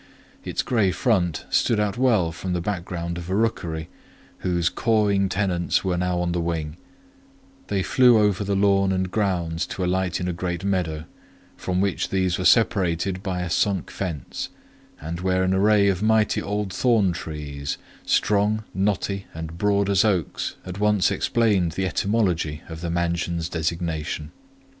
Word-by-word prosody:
Its - - -2
grey 110 -6 +2
front 90 - 0
stood 115 - +2
out 105 -1 0
well 115 -10 +2
from 90 +2 -4
the 90 - 0
background 85 -2 -3
of 85 +1 -8
a 95 - 0
rookery, 85 -8 -1 0.5
whose 85 -2 0
cawing 100 -2 +2
tenants 90 -3 0
were 95 -2 0
now 90 0 0
on 90 0 0
the 85 0 -1
wing: 80 -2 -3 0.9
they 95 -1 0
flew 125 +1 +5
over 105 -2 +2
the 100 0 -1
lawn 100 -1 +3
and 95 -1 -1
grounds 90 -5 -1
to 95 - -4
alight 90 0 0
in 90 - -2
a 90 - -1
great 90 +1 -3
meadow, 85 -5 -1 0.5
from 90 0 -2
which 100 -1 0
these 95 -2 0
were 90 - -2
separated 95 -5 +2
by 90 -3 -2
a 90 - -4
sunk 95 -1 0
fence, 85 -9 -4 0.5
and 80 +3 -5
where 95 0 +1
an 95 0 +1
array 100 +1 +4
of 95 -2 +1
mighty 110 -1 +2
old 105 -1 -3
thorn 115 -7 +3
trees, 75 -4 -5 0.3
strong, 105 +1 +2
knotty, 100 0 -1
and 80 +1 -7
broad 100 0 +2
as 100 -1 +3
oaks, 95 -7 -1
at 90 +1 -6
once 105 -2 +3
explained 100 -8 +1
the 95 +2 -1
etymology 90 -7 0
of 80 -1 -8
the 85 - -3
mansion's 85 -1 -1
designation. 80 -2 -3
95 Hz, 160 wpm, -24 LUFS, 85-100 Hz, 0.9 s, flew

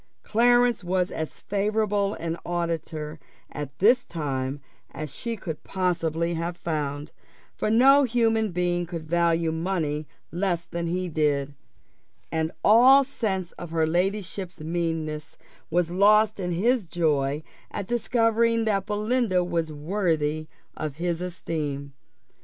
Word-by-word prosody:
Clarence 240 0 +3
was 180 0 0
as 160 -1 -5
favourable 205 0 0
an 165 0 -3
auditor 165 -3 -3 0.3
at 145 -1 -6
this 245 +5 +5
time 140 -4 -3 0.3
as 150 -1 -7
she 230 -1 -4
could 160 -5 -6
possibly 170 -3 -1
have 170 +1 -3
found; 150 -3 -3 0.4
for - - -2
no 265 +6 +6
human 225 -3 +2
being 175 0 0
could 165 -2 -6
value 170 0 +2
money 160 -3 -2 0.2
less 175 -1 -1
than 170 0 -4
he 180 +2 -1
did, 145 -3 0 0.8
and 160 0 0
all 255 +6 +7
sense 200 -9 -3
of 175 - -6
her 160 -1 +1
ladyship's 185 +2 -2
meanness 160 -1 -3 0.3
was 175 0 +1
lost 210 +3 +4
in 180 -2 -2
his 215 +4 +1
joy 150 -3 0 0.3
at 200 - -4
discovering 230 0 +2
that 200 -2 0
Belinda 210 -2 +1
was 170 -3 -1
worthy 155 -2 -1 0.3
of 150 -3 -4
his 170 +1 -2
esteem. 150 -6 -4
175 Hz, 125 wpm, -26 LUFS, 160-210 Hz, 0.8 s, all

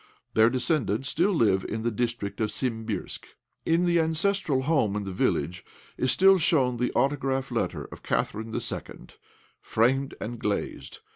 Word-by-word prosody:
Their 110 +1 +5
descendants 130 - 0
still 175 +5 +2
live 105 - +2
in 110 +1 -4
the 120 - 0
district 115 -2 -3
of 110 - +1
Simbirsk. 110 -5 -3 0.4
In 165 +2 +3
the 170 -1 +3
ancestral 160 -3 +1
home 130 -9 +1
in 105 - -2
the 95 - -5
village 90 -1 0 0.4
of - - +1
is 130 - +3
still 190 0 +5
shown 130 -7 +2
the 125 +1 0
autograph 135 0 0
letter - - -2
of - - -10
Catherine 110 +1 -2
II., - - -3 0.8
framed 135 +4 +1
and 120 +1 -5
glazed. 105 -4 -3
125 Hz, 155 wpm, -27 LUFS, 110-155 Hz, 0.8 s, Their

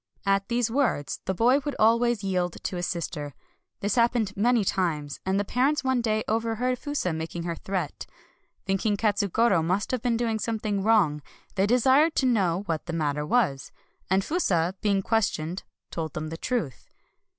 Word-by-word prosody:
At 195 0 +2
these 240 -1 0
words 245 - 0
the 190 - 0
boy 245 +7 +4
would 290 -1 -4
always 230 0 +3
yield 180 -3 -1
to - - -3
his 175 - -2
sister. 150 -5 -4 0.5
This 205 - 0
happened 235 -4 +2
many 230 +1 +2
times; 155 -7 -1
and 190 +1 +2
the 205 - -1
parents 265 +7 +1
one 260 -2 +1
day 215 -2 0
overheard 230 +3 0
Fusa 290 - -2
making 165 +1 -5
her 170 0 -2
threat. 180 -2 -4 0.6
Thinking 195 +2 0
Katsugoro 205 -2 +2
must 185 +5 0
have 255 -3 -1
been 235 -2 +1
doing 225 -2 -1
something 215 -3 -2
wrong, 195 -9 +3 0.3
they 195 0 +1
desired 265 +7 +4
to 265 - +2
know 195 -7 +2
what 165 -2 -3
the 170 - -4
matter 150 -2 -1
was, 160 - +1 0.4
and 190 +1 +2
Fusa, 185 - +1
being 200 -2 +1
ques 225 0 +2
tioned, 160 +4 -5 0.3
told 160 -3 -4
them 155 0 -4
the 165 - -5
truth. 175 - -3
205 Hz, 175 wpm, -26 LUFS, 175-235 Hz, 0.6 s, boy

